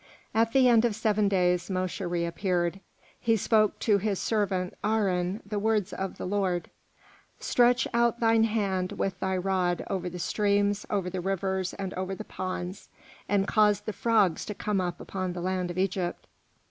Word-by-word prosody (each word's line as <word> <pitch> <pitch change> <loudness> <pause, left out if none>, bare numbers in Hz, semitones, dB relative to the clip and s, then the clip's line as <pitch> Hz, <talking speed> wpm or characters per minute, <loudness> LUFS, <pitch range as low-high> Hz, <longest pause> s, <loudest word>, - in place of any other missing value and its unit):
At 225 +1 +2
the 260 0 +5
end 235 -2 +5
of 235 -3 +1
seven 215 -1 +1
days 180 -2 +1
Mosche 185 -1 -2
reappeared. 175 +1 -1 0.4
He 225 -1 +2
spoke 215 0 +2
to 210 -3 +3
his 200 0 -1
servant 190 -4 -1
Aharon 200 -2 0
the 205 0 -3
words 215 -2 0
of 190 0 -4
the - - -5
Lord: 185 -2 -1 0.7
"Stretch 245 0 +3
out 235 0 +2
thine 225 -1 +4
hand 195 -4 -1
with 190 -2 -2
thy 190 0 0
rod 180 -1 0
over 185 -2 -2
the 180 - -7
streams, 205 +2 +1
over 195 -3 -1
the 180 0 -3
rivers, 190 0 -1
and 190 -1 -4
over 185 +1 -3
the 215 - -7
ponds, 185 -1 -5 0.4
and 200 0 +2
cause 210 -2 +3
the 215 0 -5
frogs 205 -8 +2
to 210 - -5
come 205 -2 -1
up 175 -1 -3
upon 185 -2 -4
the 175 - -5
land 185 0 -1
of 175 - -6
Egypt." 185 -2 -1
195 Hz, 170 wpm, -28 LUFS, 185-215 Hz, 0.7 s, the